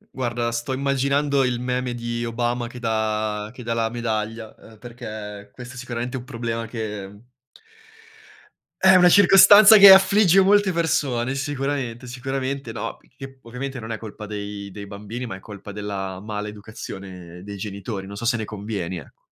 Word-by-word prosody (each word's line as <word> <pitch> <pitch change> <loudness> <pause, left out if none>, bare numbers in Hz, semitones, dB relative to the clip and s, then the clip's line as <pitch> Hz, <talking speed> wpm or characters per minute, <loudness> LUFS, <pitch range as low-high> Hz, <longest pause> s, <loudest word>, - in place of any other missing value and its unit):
Guarda, 120 -2 -2
sto 120 +3 -3
immaginando 140 +1 +1
il 125 -1 -1
meme 125 0 -2
di 120 0 -4
Obama 120 +1 -2
che 125 - -11
dà 110 -2 -2
che 125 -1 -11
dà 115 0 -2
la 115 -1 0
medaglia, 110 -1 -4
uhm, 110 -1 -17
perché 105 -3 -9
questo 125 +1 -11
sicuramente 125 0 -5
è - - -4
un 120 - -11
problema 115 -3 -4
che 105 -2 -7 1.6
è 190 0 +7
una 180 -1 +7
circostanza 205 +3 +8
che 195 -1 +11
affligge 195 -1 +5
molte 200 -1 +3
persone 135 -6 0
sicuramente, 135 -3 -3
sicuramente, 130 0 -4
no, - - -5 0.2
che 135 -1 -11
ovviamente 125 +3 -6
non 115 0 -7
è - - -4
colpa 110 -1 -9
dei 100 -1 -6
dei 100 0 -8
bambini, 105 +5 -7
ma 115 -5 -6
è - - -14
colpa 100 0 -10
della 100 -2 -5
maleducazione 100 -4 -8
dei 100 0 -8
genitori. 100 0 -6
Non 100 0 -8
so 115 - -5
se 120 +1 +2
ne 110 - -3
convieni, 100 -4 -5
ecco. 80 - -14
120 Hz, 160 wpm, -23 LUFS, 105-130 Hz, 1.6 s, che